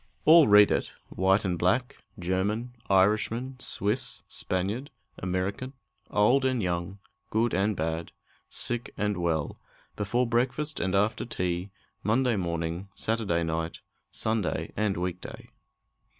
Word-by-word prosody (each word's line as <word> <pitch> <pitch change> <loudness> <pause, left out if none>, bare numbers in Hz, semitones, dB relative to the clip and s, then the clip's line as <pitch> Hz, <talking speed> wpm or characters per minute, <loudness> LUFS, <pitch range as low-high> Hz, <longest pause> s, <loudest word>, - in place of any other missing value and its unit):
All 160 -1 +8
read 105 0 +7
it: - - 0 0.2
white 95 +2 +2
and 90 -2 -1
black, 120 +9 +1 0.2
German, 100 +7 -1 0.2
Irishman, 110 +7 +2
Swiss, 120 +1 -2
Spaniard, 100 +10 -2 0.3
American, 95 +8 -2 0.4
old 120 +7 +4
and 130 -2 +1
young, 90 0 -2 0.3
good 115 +2 +1
and 100 +3 +1
bad, 80 0 -2 0.4
sick 120 0 -3
and 105 0 0
well, 80 -4 -1 0.4
before 110 +5 0
breakfast 125 +6 0
and 95 +1 0
after 105 +4 +1
tea, 90 -4 -2 0.3
Monday 120 +2 +2
morning, 85 0 -2
Saturday 105 -7 0
night, 80 0 -3 0.3
Sunday 110 -7 -1
and 105 -3 0
week 90 0 -3
day! - - -10
100 Hz, 120 wpm, -28 LUFS, 90-120 Hz, 0.4 s, All